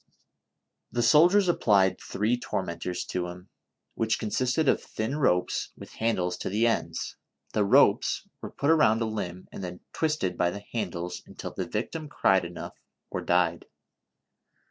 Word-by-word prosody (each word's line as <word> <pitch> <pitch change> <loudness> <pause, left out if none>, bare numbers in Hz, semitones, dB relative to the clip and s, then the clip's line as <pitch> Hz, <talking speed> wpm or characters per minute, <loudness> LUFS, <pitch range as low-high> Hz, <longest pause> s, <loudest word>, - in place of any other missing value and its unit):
The 120 - 0
soldiers 175 - +6
applied 100 - +3
three 110 +4 0
tormentors 90 -6 -3
to 90 -1 -2
him, 90 +2 -10 0.4
which 110 -1 0
consisted 125 +7 0
of - - +3
thin 110 +6 -3
ropes 90 -12 +1
\\\i\\ - - -8
liandles 90 -6 0
to - - -3
the 105 +4 +2
ends; 115 - -1 0.4
the 105 - +2
ropes 100 - +4
were - - -6
put 140 +3 +1
around 115 -9 +4
a - - 0
limb, 95 -5 -5
and - - -7
then 90 0 -6
twisted 150 - -1
by 85 - +3
the 100 +3 -7
handles 90 -6 -3
until - - -7
the 95 - -3
victim 145 - -4
cried 95 -9 +3
enough 85 0 -7 0.4
or - - -2
died. 85 -1 +1
105 Hz, 150 wpm, -27 LUFS, 90-120 Hz, 0.4 s, soldiers